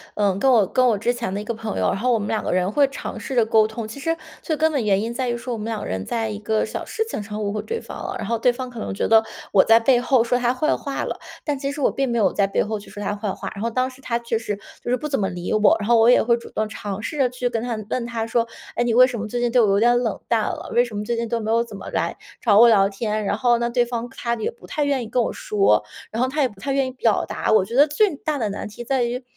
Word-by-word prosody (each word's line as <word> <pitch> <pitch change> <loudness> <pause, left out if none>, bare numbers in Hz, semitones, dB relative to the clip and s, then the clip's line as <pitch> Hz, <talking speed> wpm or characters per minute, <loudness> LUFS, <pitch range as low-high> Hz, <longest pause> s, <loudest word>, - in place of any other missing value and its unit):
嗯， 200 -2 +1
跟 270 - +3
我 230 -6 +5
跟 255 +7 +2
我 225 -4 +2
之 235 +4 0
前 235 -6 -4
的 200 - -2
一 - - -6
个 235 - -3
朋 225 -1 -5
友， - - +1
然 - - -2
后 245 +4 +1
我 - - +3
们 205 - -4
2 220 - 0
个 - - -2
人 185 +1 +1
会 280 +5 +4
尝 275 - -6
试 265 - -5
着 235 -2 +4
沟 220 -1 +4
通。 220 +1 -6
其 220 +6 -8
实 330 +4 0 0.3
最 315 - -1
根 315 +1 +2
本 275 -7 -1
原 200 -1 +3
因 230 +2 -3
在 255 0 -2
于 240 - 0
说 240 +1 -5
我 - - -3
们 210 - -5
2 225 -2 -3
个 - - -5
人 95 +1 -3
在 225 -1 -2
一 205 -1 -5
个 215 +1 0
小 - - -5
事 445 - -2
情 220 - -3
上 210 +1 -5
误 200 - -1
会 210 0 -2
对 460 0 -4
方 - - -9
了， - - -5
然 220 - -5
后 230 +2 -1
对 245 +2 +3
方 255 +1 -6
可 240 -2 -9
能 - - -4
觉 195 - -1
得 225 0 +7 0.3
我 195 - +5
在 225 +1 +6
背 245 +1 +4
后 245 -1 +3
说 245 +1 +1
她 245 0 +1
坏 305 +4 +1
话 280 -1 -4
了， - - -4 0.2
但 290 -3 -2
其 275 0 -2
实 290 - -6
我 - - +3
并 270 -1 -1
没 235 - 0
有 215 - +3
在 200 - +1
背 195 - +1
后 215 0 -3
去 205 - -14
说 205 - -7
她 205 - -1
坏 205 0 -3
话。 - - -6
然 200 - -8
后 230 - 0
当 255 +2 0
时 260 +1 -16
她 235 -3 -1
确 235 -1 -2
实 210 -2 -3 0.3
就 - - -5
是 250 - +3
不 300 +5 -5
怎 275 - 0
么 195 - +1
理 175 -1 -5
我， 215 -1 +5
然 205 - -3
后 235 - +6
我 225 +1 +6
也 245 - +5
会 235 0 +3
主 235 - -11
动 215 0 -2
尝 205 -1 -5
试 300 - -5
着 265 -3 +3
去 250 0 -2
跟 230 -2 -2
她 240 0 -2
问 245 - -1
她 230 -1 -3
说： 230 0 0 0.3
“哎， 240 - +1
你 235 - +1
为 250 +2 +8
什 250 -3 -4
么 215 - -4
最 240 +3 -3
近 240 -1 +1
对 245 0 +5
我 220 - +4
有 200 0 +3
点 240 +2 +4
冷 225 -5 -1
淡 230 -2 +3
了？ - - -4
为 240 +1 +4
什 230 -3 -9
么 205 - -2
最 235 +2 -2
近 235 0 -2
都 230 0 -1
没 220 +1 -2
有 230 +1 +2
怎 220 -3 -10
么 195 - -8
来 - - -1 0.3
找 210 -4 +4
我 235 +1 +8
聊 200 -3 +5
天？ 210 +1 -2
“然 200 - 0
后 240 +1 +3
呢， 235 0 -1
对 240 0 +2
方 240 0 -4
她 235 0 -3
也 220 - -2
不 240 - -14
太 295 - -1
愿 275 -3 0
意 - - -7
跟 250 - +1
我 - - -1
说， 195 - +2 0.3
然 230 +3 0
后 260 - +1
她 295 +3 -1
也 270 - +4
不 205 -5 -16
太 275 - -2
愿 270 -1 +1
意 - - -5
表 235 -4 +1
达。 - - -2
我 215 -3 +4
觉 230 - -6
得 285 +3 +6
最 335 +3 +2
大 300 +1 -2
的 220 -6 -1
难 200 - -5
题 210 +3 -9
在 260 +1 +1
于， 245 +2 -3
235 Hz, 360 characters per minute, -22 LUFS, 215-250 Hz, 0.3 s, 为